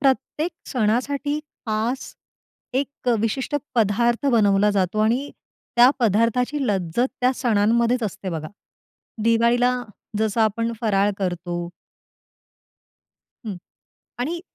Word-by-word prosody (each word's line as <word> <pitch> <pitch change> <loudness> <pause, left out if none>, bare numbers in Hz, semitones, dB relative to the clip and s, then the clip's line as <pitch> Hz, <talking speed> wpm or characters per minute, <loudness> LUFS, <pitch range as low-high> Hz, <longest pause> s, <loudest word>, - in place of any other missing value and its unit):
प्रत्येक 275 +4 +1 0.2
सणासाठी 270 +5 0 0.3
खास, 225 +5 -2 0.6
एक 280 -2 -4
अ, 240 - +4
विशिष्ट 255 +6 -1 0.2
पदार्थ 235 +4 +2
बनवला 210 -2 +4
जातो 195 +1 0
आणि 240 +6 +1 0.5
त्या 245 +2 +8
पदार्थाची 235 +6 +2
लज्जत 195 +4 +1
त्या 250 +1 +3
सणांमध्येच 235 +1 +2
असते 195 -2 -4
बघा. 155 -2 -4 0.7
दिवाळीला 235 +2 +3 0.5
जसं 220 +1 +1
आपण 230 +2 +1
फराळ 205 -2 +2
करतो 175 -2 -3 1.8
हं 200 -4 -4 0.6
आणि 335 +7 -2
230 Hz, 100 wpm, -23 LUFS, 205-250 Hz, 1.8 s, त्या